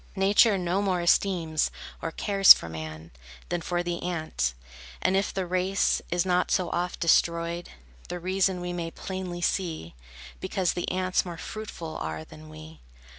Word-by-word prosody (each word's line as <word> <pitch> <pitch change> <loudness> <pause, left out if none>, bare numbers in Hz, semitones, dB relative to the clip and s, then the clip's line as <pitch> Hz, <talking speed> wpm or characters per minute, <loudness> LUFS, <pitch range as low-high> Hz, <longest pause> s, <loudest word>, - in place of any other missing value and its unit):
Nature 200 +2 +4
no 180 +2 0
more 190 -3 0
esteems 170 -3 +2 0.3
or 165 - -2
cares 195 +2 +8
for - - -7
man, 80 0 -8 0.4
Than 175 -1 -1
for 175 +1 -1
the 175 -1 -3
ant; 155 - -2 0.4
and 185 - +1
if 195 +1 +1
the 190 -1 -2
race 185 +2 +1
Is 175 +1 +1
not 180 -1 +1
so 180 -3 +1
oft 180 +1 -2
destroyed, 170 0 +1 0.4
The 180 - -4
reason 185 +1 0
we 175 0 -4
may 170 -1 -3
plainly 185 0 -6
see; 165 - -2 0.5
Because 190 -1 -1
the 175 - -3
ants 185 0 +1
more 175 -2 -7
fruitful 170 -6 -7
are 80 0 -4
than 80 0 -13
we. 80 0 -12
175 Hz, 160 wpm, -27 LUFS, 165-185 Hz, 0.5 s, cares